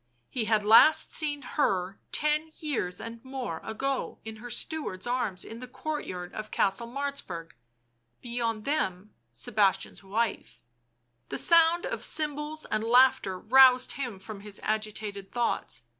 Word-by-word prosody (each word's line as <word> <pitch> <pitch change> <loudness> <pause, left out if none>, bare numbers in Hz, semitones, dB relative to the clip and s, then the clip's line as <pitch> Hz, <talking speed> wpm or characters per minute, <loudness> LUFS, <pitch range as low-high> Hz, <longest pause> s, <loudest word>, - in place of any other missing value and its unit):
He 240 -4 -1
had 215 -1 +2
last 230 +8 +7
seen 290 -3 0
her 195 -9 -1
ten 300 +1 +1
years, 235 - -2
and 230 0 -8
more, 260 -11 -5
ago 265 +5 -3
in 220 0 -7
her 245 +3 -9
steward's 240 -9 -2
arms 240 -7 -2
in 225 - -9
the 255 - -8
courtyard 255 -9 -5
of 215 0 -6
Castle 200 +5 0
Martzburg; 240 -11 -4 0.7
beyond 230 -3 -3
them 210 -10 -2 0.2
Sebastian's 195 - 0
wife.... 215 +3 -2 0.7
The 135 - -3
sound 335 - +5
of - - -4
cymbals 300 0 -1
and 215 - -1
laughter 240 -5 +4
roused 255 +4 +6
him 245 -7 -4
from 200 +2 -9
his 200 0 -5
agitated 215 -2 -3
thoughts. 235 - -2
230 Hz, 135 wpm, -28 LUFS, 200-275 Hz, 0.7 s, last